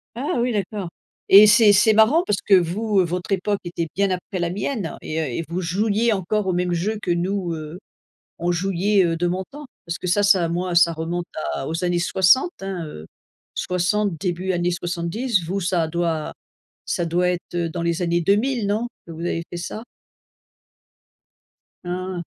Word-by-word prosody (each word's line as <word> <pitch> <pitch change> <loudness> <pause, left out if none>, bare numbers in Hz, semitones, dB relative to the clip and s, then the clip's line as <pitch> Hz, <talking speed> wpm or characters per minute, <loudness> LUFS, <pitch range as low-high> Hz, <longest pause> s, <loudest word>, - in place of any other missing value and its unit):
Ah 270 +5 -2
oui 245 +1 +1
d'accord 200 -2 -3 0.4
et 200 +2 +10
c'est 210 0 +6
c'est 215 +2 +5
marrant 235 +11 +5
parce 205 -2 0
que 195 - +5
vous, 195 +4 +1
heu, - - +3
votre 180 +3 -4
époque 195 +1 0
était 170 -1 -3
bien 200 0 +1
après 185 +1 -3
la 170 0 0
mienne 200 0 -3
et 155 - -3
heu, - - 0
et 140 +5 -3
vous 175 +3 -3
jouiez 210 +6 +1
encore 200 +1 -1
aux 185 - +1
mêmes 180 0 0
jeux 205 +6 -1
que 180 - -2
nous, 175 0 -1
heu, 155 +2 -7 0.6
on 175 +1 0
jouiez, 195 +3 +1
heu, 165 - -1
de 175 +1 0
mon 185 +2 -2
temps. 295 +1 -10 0.2
Parce 170 - -3
que - - -7
ça 195 +4 +2
ça 190 -5 +4
moi 175 +1 -2
ça 170 -1 +5
remonte 170 +2 -3 0.3
à 135 - -4
aux 165 +4 -3
années 175 -1 +1
60, 190 - +3
hein, 195 -3 -4
heu, 80 - -9 0.5
60 180 -1 0
début 185 +1 -1 0.2
70, 175 +5 -1
vous 190 +4 -2
ça 175 -3 0
doit 165 -2 -2 0.5
ça 175 - -1
doit 175 +2 +1
être, 175 0 -5
heu, 170 -1 -1
dans 170 +1 -4
les 170 +1 -1
années 170 0 +1
2000 215 +6 +1
non, 215 +4 0 0.2
que 165 - -9
vous 160 - -9
avez 170 -1 -2
fait 175 - -6
ça? 215 +5 -6 2.0
Ah, 180 +1 -4
180 Hz, 190 wpm, -22 LUFS, 170-205 Hz, 2.0 s, et